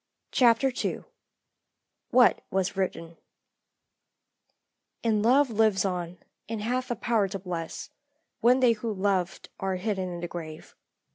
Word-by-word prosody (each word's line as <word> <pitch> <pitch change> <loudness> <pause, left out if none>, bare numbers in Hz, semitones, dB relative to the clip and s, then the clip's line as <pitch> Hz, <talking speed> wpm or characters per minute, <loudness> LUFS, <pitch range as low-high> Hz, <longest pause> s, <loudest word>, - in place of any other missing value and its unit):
CHAPTER 250 +1 +4
II - - -2 1.1
WHAT 250 -1 +5
WAS 190 0 -1
WRITTEN 170 -3 -3 1.9
"And 220 -2 +2
Love 260 +4 +4
lives 215 -3 +2
on, 180 -2 -3 0.3
and 225 -1 -3
hath 250 +3 -1
a 240 - -1
power 220 -2 +1
to 195 +1 -5
bless, 180 - -6 0.5
When 250 +3 +4
they 250 -2 +6
who 225 0 -2
loved 190 -2 -1
are 190 -1 -1
hidden 190 -1 -2
in 175 -1 -6
the 175 - -3
grave." 160 -2 -8
200 Hz, 130 wpm, -27 LUFS, 180-235 Hz, 1.9 s, they